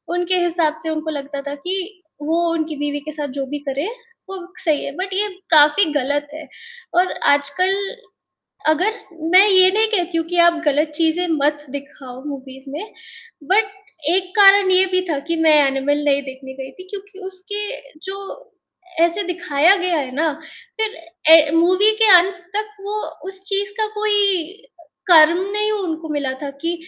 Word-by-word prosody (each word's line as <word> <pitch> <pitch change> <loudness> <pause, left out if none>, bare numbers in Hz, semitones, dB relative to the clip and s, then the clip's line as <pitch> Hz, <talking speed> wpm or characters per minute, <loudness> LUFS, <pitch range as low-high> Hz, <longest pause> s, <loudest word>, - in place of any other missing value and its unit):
उनके 355 +1 0
हिसाब 330 -3 0
से 320 - -4
उनको 315 0 -4
लगता 280 -1 -6
था 285 - -4
कि 365 +4 -4 0.2
वो 325 +3 0
उनकी 315 -1 -3
बीवी 290 0 -3
के 310 - -6
साथ 300 -1 -5
जो 270 - -2
भी 295 - -4
करें 280 +7 -3 0.4
वो 385 - -4 0.3
सही 310 -5 0
है, - - -5
बट 380 +3 -5
ये 410 +2 +2 0.2
काफ़ी 300 +5 +6
गलत 290 +1 -1
है 310 0 -9 0.5
और 360 +1 +2 0.2
आजकल 290 +7 0 0.9
अगर 365 +8 +1 0.4
मैं 380 +3 +7
ये 370 -1 +6
नहीं 440 +2 +3
कहती 350 -3 -1
हूँ 330 - -1
कि 355 +1 -3
आप 335 -2 0
गलत 295 +2 +2
चीज़ें 330 +2 0 0.2
मत 295 0 0
दिखाओ 275 -2 -9
मूवीज़ 270 -1 -9
में 310 +8 -5 0.7
बट 405 0 +3 0.4
एक 370 -1 -1
कारण 395 -1 +7
ये 370 +1 +5
भी 370 0 +2
था 290 -3 -1
कि - - +1
मैं 310 -1 +5
एनिमल 275 +2 -1
नहीं 280 -1 +2
देखने 265 0 -10
गई 265 0 -9
थी 370 - -11
क्योंकि 405 0 -10
उसके 410 +2 -3 0.4
जो 390 - -5 0.8
ऐसे 340 +4 +2
दिखाया 350 -1 +2
गया 360 -3 -1
है 265 -3 -3
ना, 315 +2 0 0.5
फिर 440 -1 -1 0.4
ए 315 -2 +6
मूवी 370 +5 +4
के - - +8
अंत 360 +2 +1 0.2
तक 425 0 -3
वो 415 +1 -4 0.3
उस 385 0 -8
चीज़ 400 0 -1
का 435 - +2
कोई 410 -4 +3 0.6
कर्म 330 -1 +7
नहीं 420 +1 -1
उनको 330 -6 -4
मिला 280 -3 -2
था 280 - -4
कि 335 +1 0
335 Hz, 170 wpm, -19 LUFS, 290-380 Hz, 0.9 s, के